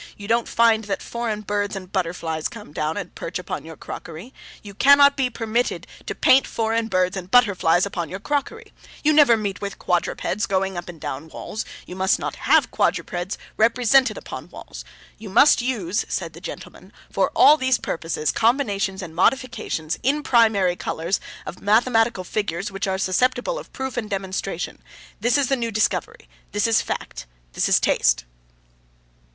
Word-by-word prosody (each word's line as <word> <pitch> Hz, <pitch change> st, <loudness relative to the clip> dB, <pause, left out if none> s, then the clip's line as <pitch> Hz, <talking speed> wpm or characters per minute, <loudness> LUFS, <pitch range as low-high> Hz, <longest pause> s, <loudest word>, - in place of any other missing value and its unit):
You 200 Hz, -, -9 dB
don't 230 Hz, +1 st, +1 dB
find 225 Hz, -2 st, +3 dB
that 200 Hz, -, -2 dB
foreign 230 Hz, -3 st, -3 dB
birds 205 Hz, 0 st, -2 dB
and 185 Hz, -1 st, -8 dB
butterflies 165 Hz, -4 st, -2 dB
come 210 Hz, -9 st, -12 dB
and 160 Hz, +5 st, -3 dB
perch 165 Hz, -, -5 dB
upon 180 Hz, -3 st, -6 dB
your 160 Hz, -1 st, -10 dB
crockery; 170 Hz, +11 st, -9 dB, 0.3 s
you 205 Hz, -1 st, -10 dB
cannot 280 Hz, +5 st, +6 dB
be 260 Hz, -2 st, 0 dB
permitted 230 Hz, 0 st, -2 dB, 0.2 s
to -, -, -3 dB
paint 265 Hz, +1 st, +4 dB
foreign 225 Hz, 0 st, -1 dB
birds 185 Hz, -2 st, +1 dB
and 185 Hz, -1 st, -6 dB
butterflies 190 Hz, -7 st, +4 dB
upon 175 Hz, -5 st, -4 dB
your 190 Hz, -, -6 dB
crockery. 295 Hz, -, -3 dB, 0.3 s
You 310 Hz, 0 st, +4 dB
never 285 Hz, -6 st, +6 dB
meet 200 Hz, -3 st, -4 dB
with 200 Hz, -1 st, -5 dB
quadrupeds 180 Hz, +3 st, -1 dB
going 190 Hz, 0 st, 0 dB
up 175 Hz, 0 st, -6 dB
and 170 Hz, -2 st, -10 dB
down 145 Hz, +2 st, -5 dB
walls; 215 Hz, +6 st, -6 dB, 0.2 s
you 180 Hz, -, -9 dB
must 190 Hz, +1 st, +2 dB
not -, -, -4 dB
have -, -, +3 dB
quadrupeds 175 Hz, +2 st, -1 dB, 0.2 s
represented 240 Hz, +1 st, +3 dB
upon -, -, -8 dB
walls. -, -, -10 dB, 0.4 s
You 215 Hz, -2 st, -8 dB
must 245 Hz, +7 st, +5 dB
use,' 210 Hz, -7 st, -1 dB
said -, -, -3 dB
the -, -, -12 dB
gentleman, -, -, -9 dB, 0.2 s
'for -, -, +1 dB
all 300 Hz, -, +8 dB
these 260 Hz, -4 st, +1 dB
purposes, 165 Hz, -2 st, -2 dB
combinations 205 Hz, -6 st, 0 dB
and 165 Hz, -3 st, -8 dB
modifications 190 Hz, -, 0 dB
(in 290 Hz, +4 st, +1 dB
primary 220 Hz, -8 st, +3 dB
colours) 170 Hz, +2 st, -2 dB, 0.3 s
of 180 Hz, -, -8 dB
mathematical 225 Hz, -1 st, +2 dB
figures 195 Hz, -1 st, -3 dB
which 195 Hz, 0 st, -3 dB
are 190 Hz, 0 st, 0 dB
susceptible 250 Hz, -, 0 dB
of -, -, -12 dB
proof 265 Hz, -1 st, -5 dB
and 220 Hz, -3 st, -3 dB
demonstration. 190 Hz, -2 st, -4 dB, 0.4 s
This 240 Hz, +3 st, +2 dB
is 280 Hz, -2 st, +1 dB
the 270 Hz, -, +3 dB
new 235 Hz, -3 st, -2 dB
discovery. 220 Hz, 0 st, -1 dB, 0.3 s
This 205 Hz, 0 st, +1 dB
is 225 Hz, -1 st, +3 dB
fact. 65 Hz, -, -5 dB, 0.3 s
This -, -, 0 dB
is -, -, +5 dB
taste. -, -, +2 dB
205 Hz, 170 wpm, -22 LUFS, 185-240 Hz, 0.4 s, all